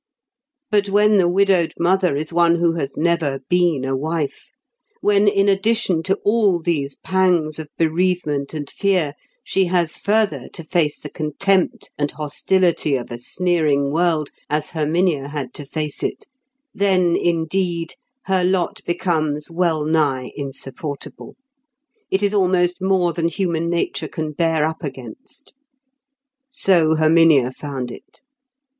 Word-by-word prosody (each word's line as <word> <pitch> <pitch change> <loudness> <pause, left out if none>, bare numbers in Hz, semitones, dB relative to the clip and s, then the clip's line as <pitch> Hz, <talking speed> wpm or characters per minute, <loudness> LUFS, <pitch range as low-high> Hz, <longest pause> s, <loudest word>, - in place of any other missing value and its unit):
But 205 -1 +2
when 210 +1 +4
the 180 -3 +4
widowed 185 -2 +2
mother 180 -2 +2
is 155 +3 -4
one 170 0 +4
who 170 0 +2
has 140 -5 -4
never 160 -4 +1
been 175 -6 +2
a 135 0 -1
wife—when 200 - -2
in 200 0 +3
addition 195 -3 +1
to 195 +3 0
all 205 -4 +3
these 150 -5 -1
pangs 175 -5 +1
of 155 - -6
bereavement 160 -3 0
and 145 -2 -4
fear, 180 -5 0 0.3
she 190 0 +1
has 175 -3 0
further 200 - 0
to 165 - -7
face 155 -2 0
the - - -9
contempt 185 +5 0
and 145 0 0
hostility 155 +1 0
of 120 -2 -5
a 120 - -6
sneering 150 -2 0
world, 160 -2 +1 0.2
as 150 0 -1
Herminia 155 -2 0
had 145 -4 -5
to 145 - -9
face 150 0 -4
it—then, 255 -10 -2
indeed, 170 0 -1 0.3
her 190 -1 +1
lot 180 -1 0
becomes 155 -4 -1
well 165 -3 0
nigh 145 -5 0
insupportable; 140 0 -7 0.7
it 190 +2 0
is 205 0 +1
almost 180 -2 +2
more 185 -2 +2
than 165 0 0
human 170 -3 -1
nature 170 0 -1
can 155 -1 -4
bear 160 0 +1
up 160 +2 -4
against. 135 - -9 1.0
So 175 - +3
Herminia 155 -4 +4
found 130 -2 -6
it. - - -14
170 Hz, 135 wpm, -20 LUFS, 150-185 Hz, 1.0 s, when